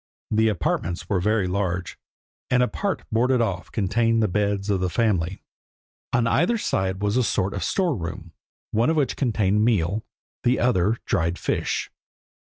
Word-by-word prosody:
The 110 +1 +3
apartments 90 -3 -1
were 100 -4 +2
very 105 +1 +1
large, 90 -1 -2 0.5
and 125 0 +4
a - - +2
part 200 +7 -2
boarded 125 +3 +2
off 100 -6 -2
contained 115 +2 +1
the - - +3
beds 100 0 0
of 95 - +1
the 90 0 0
family. 95 -4 0 0.7
On 120 -1 +2
either 170 - +2
side 95 - -1
was 105 +3 +1
a 130 - +3
sort 100 -2 0
of 95 - -3
store 175 - +1
room, 85 -1 -6 0.4
one 115 +5 +2
of 160 - +2
which 145 -5 +1
contained 105 -5 +1
meal, 105 -2 +1 0.4
the 125 +1 +2
other 110 -2 +2
dried 85 -4 0
fish. - - -2
105 Hz, 165 wpm, -24 LUFS, 95-120 Hz, 0.7 s, and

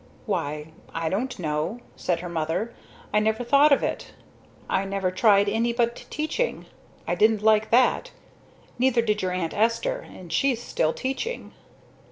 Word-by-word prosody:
"Why 155 -6 -3 0.2
I 165 -1 -1
don't 245 +7 -2
know," 160 +5 -2 0.2
said 170 -2 -1
her 180 - -5
mother. 170 +7 -2 0.4
"I 210 - +5
never 220 +2 0
thought 280 +5 +5
of 280 - +4
it. - - -3 0.5
I 190 - +1
never 195 -1 -1
tried 200 +1 +4
any 230 +3 +1
but 235 0 +1
teaching. 315 +12 -2 0.4
I - - +1
didn't 215 -1 +3
like 220 0 +4
that. 255 - +3 0.7
Neither 250 -2 +3
did 210 -2 0
your 185 - 0
Aunt 180 -3 -2
Esther, 235 - 0
but 175 -3 -11
she's 250 +7 +2
still 160 -9 0
teaching." 270 - -4
215 Hz, 155 wpm, -25 LUFS, 180-245 Hz, 0.7 s, I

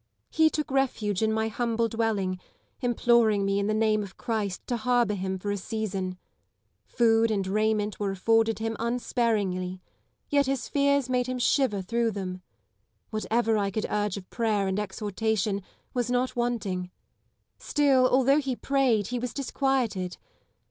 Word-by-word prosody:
He 315 0 +4
took 305 -3 -3
refuge 225 -7 0
in 220 0 +2
my 220 0 0
humble 230 +1 0
dwelling, 210 -5 -1 0.4
imploring 235 -4 +3
me 195 0 +1
in 200 - 0
the 215 - +1
name 215 -1 +2
of 195 -2 -8
Christ 210 -5 -3
to 240 - -1
harbour 240 -2 +2
him 190 -1 -2
for 205 +2 -3
a 205 - -1
season. 195 -3 -3 0.7
Food 230 -1 +3
and 200 -3 0
raiment 215 +1 0
were 205 -1 0
afforded 225 +3 +2
him 225 0 -2
unsparingly; 215 -6 -1 0.5
yet 285 -2 +2
his 270 -2 -1
fears 280 -2 +2
made 250 -1 0
him 255 0 -2
shiver 245 -5 +1
through 235 +4 0
them. 185 -3 -5 0.7
Whatever 225 0 +1
I 200 -1 0
could 215 +2 -2
urge 205 -1 0
of 185 -2 -9
prayer 215 -4 0
and 190 +1 -1
exhortation 210 -1 -1 0.3
was 245 -1 -1
not 250 +1 0
wanting; 205 -7 -2 0.7
still, 270 -4 +3
although 270 +3 +4
he 270 -3 -2
prayed, 250 -7 +1
he 245 0 -2
was 245 -1 -4
disquieted. 255 -9 -1
220 Hz, 155 wpm, -27 LUFS, 200-245 Hz, 0.7 s, He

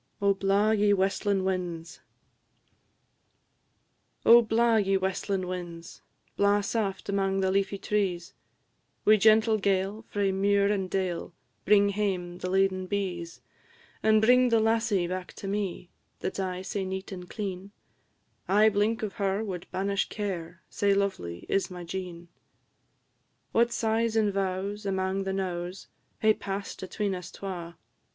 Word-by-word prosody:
OH, 200 0 +3
BLAW, 195 +2 +2
YE 210 -1 +3
WESTLIN' 195 0 +1
WINDS! 175 -3 -3 2.3
Oh, 235 +1 +9
blaw, 230 +1 +3
ye 195 -2 +2
westlin' 190 0 -2
winds, 175 -2 -7 0.3
blaw 200 +1 +3
saft 200 -2 -2
Amang 195 -1 +1
the 190 0 +1
leafy 195 +1 0
trees! 190 -4 -1 0.7
Wi' 215 0 +7
gentle 220 +1 +4
gale, 195 +2 0
frae 200 -1 0
muir 200 +1 +2
and 195 -3 -1
dale, 180 -3 -2 0.3
Bring 205 0 +5
hame 185 -4 -2
the 185 - -3
laden 190 0 +1
bees; 180 -4 -3 0.6
And 220 0 +4
bring 250 +2 +5
the 230 -1 +4
lassie 220 -4 +2
back 185 +1 -5
to 195 - -8
me, 195 -3 -3 0.3
That 190 - -3
's - - -4
aye 185 -1 -2
sae 195 +1 -3
neat 190 +1 -5
and 180 -2 -8
clean; 195 -2 -5 0.8
Ae 210 +3 +6
blink 215 +3 0
of 205 -3 -3
her 195 +2 +1
wad 185 -5 -5
banish 200 +1 -1
care, 175 -5 -5
Sae 200 -1 +1
lovely 140 - -2
is 195 - 0
my 180 -1 -8
Jean. 175 -1 -6 1.2
What 235 +1 +3
sighs 225 0 0
and 210 -2 +2
vows, 195 +2 -2
amang 190 0 -1
the 195 - -1
knowes, 180 -1 -4 0.3
Hae 215 0 +5
pass'd 200 -1 -5
atween 195 +1 -2
us 180 -1 -6
twa! 175 -3 -7
195 Hz, 140 wpm, -28 LUFS, 185-205 Hz, 2.3 s, Oh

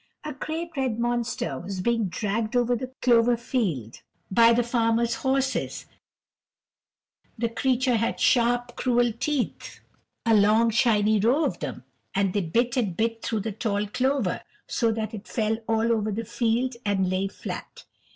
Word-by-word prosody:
A 300 -1 -5
great 320 +5 -4
red 260 -5 -1
monster 240 - -1
was 190 +1 -6
being 230 +2 +1
dragged 215 +4 -2
over 245 0 +3
the 255 +2 -5
clover 240 -1 +4
field 185 - -2 0.3
by 230 +4 +6
the 240 +1 +3
farmer's 235 0 +1
horses; 265 +1 -1 1.5
the 235 +1 0
creature 255 0 +1
had 230 +1 -1
sharp, 245 0 +2
cruel 245 -1 +2
teeth, 255 +3 -3 0.5
a 230 - +4
long, 215 +2 +4
shining 215 -1 +3
row 250 +10 +3
of - - -2
them, - - -5 0.3
and 195 -1 +1
they 205 - +1
bit 235 +8 0
and 200 -9 0
bit 225 0 0
through 220 -2 -2
the 220 +2 -3
tall 205 0 -1
clover, 255 -1 0 0.3
so 230 -2 +1
that 220 0 -3
it 210 -1 -8
fell 220 -1 0
all 225 +1 +2
over 215 -2 0
the 225 +3 -3
field 235 +3 0
and 195 -2 +1
lay 185 +1 0
flat. 195 - -8
230 Hz, 155 wpm, -26 LUFS, 210-245 Hz, 1.5 s, by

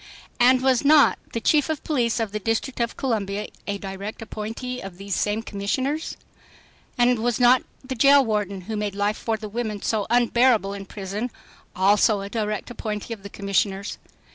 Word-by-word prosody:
And 255 +1 +5
was 260 -1 +3
not 295 0 +6
the 230 - -2
Chief 295 +6 +2
of 315 -2 -2
Police 245 -7 0
of 225 -3 -1
the 215 - -3
District 225 +5 -2
of 235 -1 -1
Columbia 210 -5 -2 0.2
a 205 -1 -1
direct 195 +2 -6
appointee 225 +4 -5
of 190 -2 -9
these 195 0 -3
same 210 +2 0
commissioners? 260 +10 -2 0.8
And 245 -1 +3
was 240 +1 0
not 250 +1 +6 0.2
the 260 0 -4
jail 275 +2 +6
warden 205 -3 -1
who 220 +5 -5
made 210 -1 -2
life 205 +1 0
for 225 -1 -1
the 215 0 -7
women 215 -1 -4
so 215 -3 0
unbearable 235 -3 +3
in 195 -1 -7
prison 205 +5 -4 0.5
also 200 +2 +4
a 200 - -6
direct 215 +1 -3
appointee 215 -1 -4
of 215 - -10
the 200 - -9
commissioners? 200 0 -1
220 Hz, 175 wpm, -24 LUFS, 200-245 Hz, 0.8 s, not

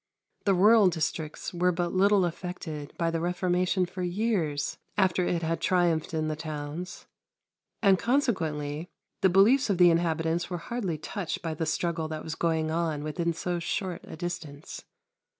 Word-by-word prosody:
The 195 -2 +4
rural 210 +2 +6
districts 160 -2 -2
were 180 +1 +2
but 175 0 -2
little 195 0 +4
affected 165 -4 -5
by 165 -1 +1
the 165 - -1
Reformation 180 +1 +1
for 180 +1 -7
years 175 -6 -1 0.2
after 185 -2 +3
it 170 -1 0
had 165 +1 -1
triumphed 175 -3 +2
in 155 -1 -1
the 155 - -1
towns, 155 +2 -6 0.8
and 195 -2 +5
consequently 165 - 0 0.3
the 190 - +5
beliefs 220 +9 +5
of 195 - +2
the 175 -1 +7
inhabitants 165 0 0
were 180 - -2
hardly 185 -2 -3
touched 170 +3 -4
by 165 -1 -2
the 160 +1 -3
struggle 165 0 -1
that 155 -1 -5
was 160 - -4
going 160 -1 0
on 160 -3 -1
within 170 +3 -1
so 175 +1 -2
short 180 +1 -3
a - - -9
distance. 165 -4 -6
170 Hz, 160 wpm, -28 LUFS, 160-185 Hz, 0.8 s, the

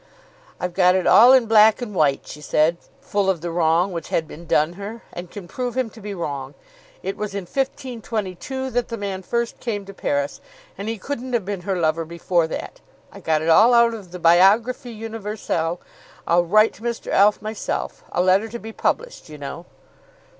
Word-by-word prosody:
"I've 180 -1 -3
got 180 0 +4
it 185 - 0
all 240 +4 +8
in 260 -3 +6
black 220 -1 +6
and 240 -4 -6
white," 145 -6 +1
she 150 - -10
said, 155 +3 +2 0.2
full 200 -1 0
of 180 -4 0
the 170 0 -4
wrong 170 +2 +2
which 170 -2 -6
had 160 - 0
been 165 +2 -11
done 155 +3 +2
her, 205 +5 -8
"and 175 0 -7
can 195 -2 -9
prove 250 +5 -4
him 250 -4 0
to 225 - -14
be 205 0 -6
wrong. 140 -5 -5 0.5
It 195 - -3
was 210 -1 -4
in 200 - -3
1522 255 +1 -4
that 245 0 0
the 230 - -5
man 200 -2 -4
first 235 +5 -2
came 205 -4 -3
to 195 - -10
Paris, 145 -5 -2 0.3
and 200 +3 -5
he 225 - -3
couldn't 255 +3 -5
have 230 -6 0
been 200 -2 -4
her 190 +1 -2
lover 165 0 +1
before 170 +1 0
that. - - -7 0.3
I - - -11
got 155 -1 0
it 165 - 0
all 225 +9 +6
out 235 0 +5
of 205 -5 -9
the 180 - -8
'Biographie 200 +9 +4
Universelle.' 210 -6 -3 0.5
I'll 175 +1 +3
write 215 +5 +4
to - - -17
Mr. 235 0 -4
Alf 205 +1 +4
myself, 215 0 -4
a 180 - +1
letter 190 +4 +3
to 235 - -6
be 225 -1 -9
published, - - -2
you 150 - -9
know." 145 +4 -7
195 Hz, 200 wpm, -22 LUFS, 170-225 Hz, 0.5 s, all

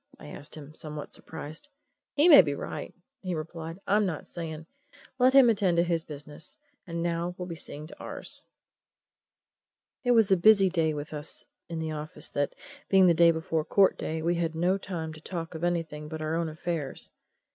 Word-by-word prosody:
I 75 - -10
asked 145 - -8
him, 150 -1 -10
somewhat 150 -1 -7
surprised. 155 - -8 0.5
"He 300 +4 +5
may 310 - +11
be 145 -5 -2
right," - - -5 0.3
he 185 -2 -2
replied. 165 +2 -6
"I'm 210 +1 +3
not 180 -6 -2
saying. 160 -2 -6 0.5
Let 255 +1 +5
him 270 -2 +8
attend 200 -6 +3
to 170 - +5
his 170 -2 +1
business 150 - -9 0.3
and 170 -1 -3
now 170 +1 -1
we'll 180 - -4
be 170 - -5
seeing 150 -2 -8
to 155 - -12
ours." - - -2 1.6
It 245 - -1
was 225 -4 +4
a 190 - +6
busy 195 +1 +6
day 160 -3 +1
with 150 +1 -6
us 150 0 -3 0.2
in 165 - -4
the 160 -1 -2
office 155 0 -5
that, 145 0 -1 0.3
being 190 -1 +6
the 175 - +6
day 170 +1 +6
before 160 -1 0
court 195 +4 +4
day, 160 - -3
and 160 - -4
we 170 - +3
had 165 -2 -1
no 180 +4 +2
time 165 -5 -5
to 155 - -12
talk 165 -1 -5
of 160 +1 -6
anything 165 -4 -1
but 160 0 -6
our 155 0 -2
own 165 0 0
affairs. 155 -2 -4
165 Hz, 195 wpm, -28 LUFS, 155-180 Hz, 1.6 s, may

